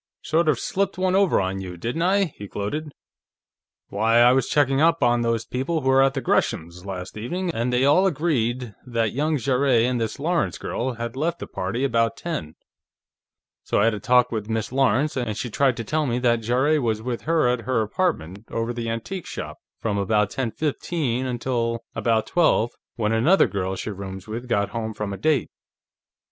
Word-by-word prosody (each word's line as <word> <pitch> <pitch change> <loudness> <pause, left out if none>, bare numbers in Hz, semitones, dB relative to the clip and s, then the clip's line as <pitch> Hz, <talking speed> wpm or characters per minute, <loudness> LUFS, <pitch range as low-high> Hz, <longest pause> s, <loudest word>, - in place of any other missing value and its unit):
"Sort 160 +1 +2
of 145 - +3
slipped 195 +8 -1
one 185 0 +1
over 195 -1 +4
on 95 0 -2
you, 90 -2 -7
didn't 120 - -3
I?" 195 +3 +3
he 100 - -8
gloated. 145 +11 -4 1.0
"Why, 110 +3 +2
I 120 +1 +7
was 130 -1 +1
checking 140 -1 +2
up 165 +1 +3
on 120 0 +3
those 115 -1 0
people 145 +6 -2
who 130 - 0
were 135 0 +5
at 135 -1 +1
Gresham's, 85 +4 -1
last 90 -2 -6
evening, 170 +11 -3
and 120 0 -1
they 125 +2 +2
all 180 +7 +5
agreed 130 - -1
that 115 -4 -1
young 150 +4 +1
Jarrett 130 -2 +2
and 125 -1 0
the 110 - -2
Lawrence 170 +4 0
girl 125 +2 -3
had 120 +1 -5
left 165 +5 -1
the - - -6
party 100 +8 -3
about 115 -4 +1
ten. 85 - -5 1.1
So - - 0
I - - +4
had 115 - +3
a 105 - -4
talk 125 +3 +3
with 110 -2 -3
Miss 110 0 -2
Lawrence, 135 +2 +2
and 120 -5 -2
she 120 - -4
tried 130 +1 +2
to 115 - -3
tell 150 +7 0
me 120 -1 0
that 120 -2 +2
Jarrett 130 +7 +2
was 110 -3 -1
with 120 -1 -3
her 165 -5 +3
at 125 -1 +1
her 130 -4 +1
apartment, 105 - -2
over 115 +1 -2
the 115 -1 -4
antique 135 - -4
shop, - - -6 0.2
from 105 -3 -1
about 105 0 +1
ten 130 -3 -2
fifteen 140 -2 -2
until 120 -2 -1
about 115 -2 +1
twelve, 160 -9 +2 0.2
when 110 -3 0
another 125 +13 +4
girl 95 -1 -2
she 110 - -4
rooms 95 -1 -7
with 120 +3 -6
got 100 -3 +1
home 110 0 -4
from 105 -1 -3
a - - -5
date. 145 +5 +1
120 Hz, 195 wpm, -24 LUFS, 110-145 Hz, 1.1 s, I